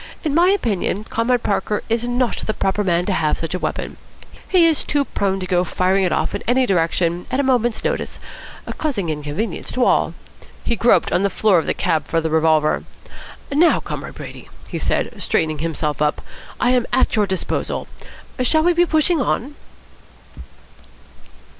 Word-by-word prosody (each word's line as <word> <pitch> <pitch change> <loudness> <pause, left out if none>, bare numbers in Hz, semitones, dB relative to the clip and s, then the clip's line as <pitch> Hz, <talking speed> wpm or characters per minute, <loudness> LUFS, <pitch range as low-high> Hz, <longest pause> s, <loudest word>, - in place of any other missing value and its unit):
In 305 -4 -1
my 345 +4 +5
opinion, 215 - 0
Comrade 230 +2 0
Parker 210 +1 -1
is 230 +1 0
not 245 0 0
the 215 - -3
proper 195 +2 0
man 175 -2 +1
to 200 - 0
have 155 -4 +1
such 165 +1 -4
a 185 - -2
weapon. - - -4 0.5
He 360 -3 +5
is 320 -2 +2
too 285 -1 0
prone 195 -5 -1
to 185 - -4
go 180 -1 +2
firing 185 +2 +1
it 180 - +1
off - - 0
in - - -3
any 255 +2 +3
direction 170 -2 0
at 260 - -1
a - - +2
moment's 240 -3 +1
notice, - - -2 0.6
causing 235 - -1
inconvenience 155 +7 -4
to 250 - +1
all." - - +2 0.5
He 235 - 0
groped 235 +1 +3
on - - +2
the 200 - +2
floor 195 -1 +3
of 160 - -4
the - - 0
cab 155 -2 0
for 165 - +1
the 160 -1 -2
revolver. 155 -1 +2 0.7
"Now, 330 +4 +4
Comrade - - -7
Brady," - - -10 0.2
he - - -4
said, - - -2
straightening 155 -2 0
himself 155 -2 -2
up, 150 0 0 0.4
"I 245 - +3
am 250 -2 +2
at 260 -1 +2
your 210 -2 +2
disposal. 190 -2 -2 0.5
Shall 315 +5 +3
we 350 +1 +4
be 350 +1 +3
pushing 315 0 +2
on?" 260 +2 -1
210 Hz, 180 wpm, -20 LUFS, 170-255 Hz, 0.7 s, my